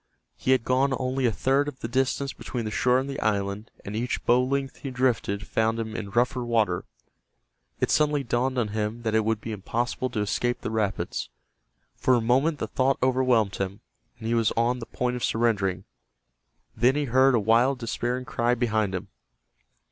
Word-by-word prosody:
He - - -5
had 130 -3 +4
gone 130 +1 +2
only 130 0 0
a - - +2
third 135 +6 +1
of 145 -3 -7
the - - -2
distance 135 +2 0
between 120 -3 -5
the 110 - -3
shore 125 +3 +3
and 130 +1 -1
the 140 0 -4
island 100 0 -1 0.2
and 100 - -5
each 120 +3 -2
bow 125 +1 +4
length 135 +1 -2
he 140 - -6
drifted 125 -5 0
found 110 +1 0
him 110 -1 -4
in 100 -3 -4
rougher 120 +3 +1
water. 110 -7 +1 0.9
It - - +1
suddenly 150 -2 +2
dawned 130 +2 0
on 115 -4 +1
him 110 +2 -3
that 110 -1 -1
it 110 0 +3
would 110 0 0
be 115 - -6
impossible 120 +5 -2
to 110 -3 -2
escape 120 +4 -1
the - - -3
rapids. 105 - -2 0.7
For 130 - +3
a - - +3
moment 130 +7 +2
the - - -2
thought 135 +1 +1
overwhelmed 125 -6 +2
him, 100 +1 -4 0.4
and 110 - -10
he 115 - +1
was 115 -2 +2
on 120 +2 +2
the 115 - -7
point 125 0 -2
of 125 - -6
surrendering. 100 -6 +1 0.9
Then 125 +4 +3
he 150 0 0
heard 130 +1 +4
a - - +3
wild 115 +6 +3
despairing 125 +1 -2
cry 120 0 +1
behind 110 -5 0
him. 95 +2 -5
120 Hz, 195 wpm, -26 LUFS, 110-130 Hz, 0.9 s, had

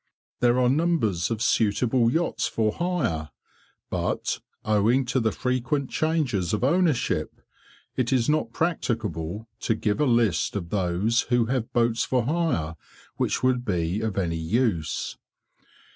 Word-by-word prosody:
There 120 0 +3
are 125 -1 +3
numbers 135 - +1
of 115 -1 -2
suitable 115 +2 +2
yachts 165 +5 0
for 110 -1 0
hire, 130 - -1 0.6
but, - - -1 0.3
owing 110 +5 +3
to 130 +2 0
the 110 -2 +1
frequent 130 +2 -1
changes 140 - 0
of 105 - -1
ownership, 140 - +1 0.6
it 125 0 0
is 125 -3 +2
not 150 -6 +1
practicable 115 - -2
to 115 - 0
give 105 +1 -1
a - - +4
list 115 -10 +2
of 85 -4 -4
those 100 +4 +1
who 120 -2 +3
have 120 -1 -2
boats 115 -1 +2
for 125 -3 +1
hire, 135 - 0 0.4
which - - 0
would 130 -1 +2
be 90 -2 -1
of 110 -3 -2
any 85 -4 0
use. 85 - -1
115 Hz, 140 wpm, -25 LUFS, 100-130 Hz, 0.6 s, a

